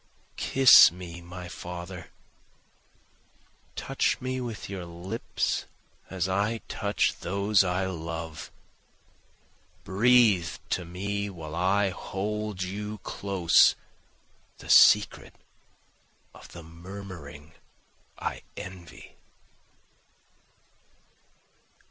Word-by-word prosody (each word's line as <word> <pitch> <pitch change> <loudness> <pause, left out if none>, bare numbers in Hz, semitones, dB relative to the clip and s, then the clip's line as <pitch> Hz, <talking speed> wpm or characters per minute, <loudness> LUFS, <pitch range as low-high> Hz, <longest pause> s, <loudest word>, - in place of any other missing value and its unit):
Kiss 135 -9 +7
me 85 -1 -9
my 90 +1 -9
father, 90 0 -8 1.7
Touch - - -1
me 130 0 -3
with 120 -4 -6
your 95 -2 -6
lips 85 +2 -3 0.4
as 95 -1 -2
I 105 +4 -1
touch 100 -1 -1
those 100 +2 +2
I 90 +1 -1
love, 80 -3 -6 1.3
Breathe 105 -3 +3
to 90 - -1
me 100 +4 -4
while 80 -5 -9
I 95 +3 +1
hold 105 +1 -4
you 105 +3 -5
close 95 -5 +3 0.8
the - - -5
secret - - +5 1.0
of - - -14
the 85 - -10
murmuring 85 -3 -10 0.6
I - - -4 0.2
envy. 90 -2 -10
95 Hz, 80 wpm, -27 LUFS, 85-100 Hz, 1.7 s, Kiss